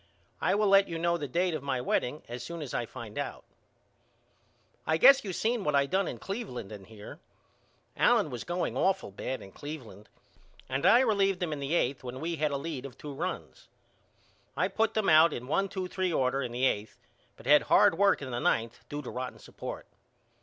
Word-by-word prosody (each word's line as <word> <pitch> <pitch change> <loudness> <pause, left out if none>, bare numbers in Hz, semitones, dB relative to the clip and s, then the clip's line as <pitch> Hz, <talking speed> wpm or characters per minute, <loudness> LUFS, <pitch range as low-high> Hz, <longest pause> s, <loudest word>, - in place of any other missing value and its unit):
I - - +2
will 210 +1 +2
let 195 0 +6
you 165 - -4
know 170 +1 +1
the 150 -4 -4
date 175 +6 0
of 155 - -3
my 135 -2 -1
wedding 125 +3 -1
as 120 +1 -6
soon 170 -2 -6
as 135 - -7
I 120 - -2
find 115 -4 -8
out. - - -5 1.4
I 160 - +3
guess 275 +10 +7
you 195 - -4
seen 225 +4 0
what 150 -4 +1
I 140 0 +4
done 190 +7 0
in - - -5
Cleveland 195 - -6
and 100 -3 -10
here. 105 -2 -11 0.8
Allen - - +3
was 120 - -5
going 175 +1 -2
awful 190 - +1
bad 130 +6 -5
in 95 - -12
Cleveland 120 -7 -9 0.6
and 135 +1 0
I 240 - +7
relieved 195 -6 +2
him 160 -3 -2
in 145 - -5
the 140 +4 -1
eighth 135 -4 0
when 130 +1 -6
we 165 +2 -3
had 150 0 +1
a 140 - -2
lead 140 -2 -5
of 125 - -15
two 145 -1 -8
runs. 175 +7 -5 0.9
I - - +1
put 225 0 0
them 215 -2 +1
out 160 +1 +6
in 120 - -5
one 195 +8 0
two 185 -1 -4
three 185 -1 -1
order 135 -2 +1
in 125 -2 -4
the 125 +2 0
eighth 105 -4 -1 0.4
but - - -15
had - - +6
hard - - +6
work 200 -4 +3
in 130 - -6
the 120 - -2
ninth 115 -1 0
due 145 0 -5
to - - -6
rotten 125 0 -5
support. - - -8
150 Hz, 210 wpm, -29 LUFS, 125-185 Hz, 1.4 s, guess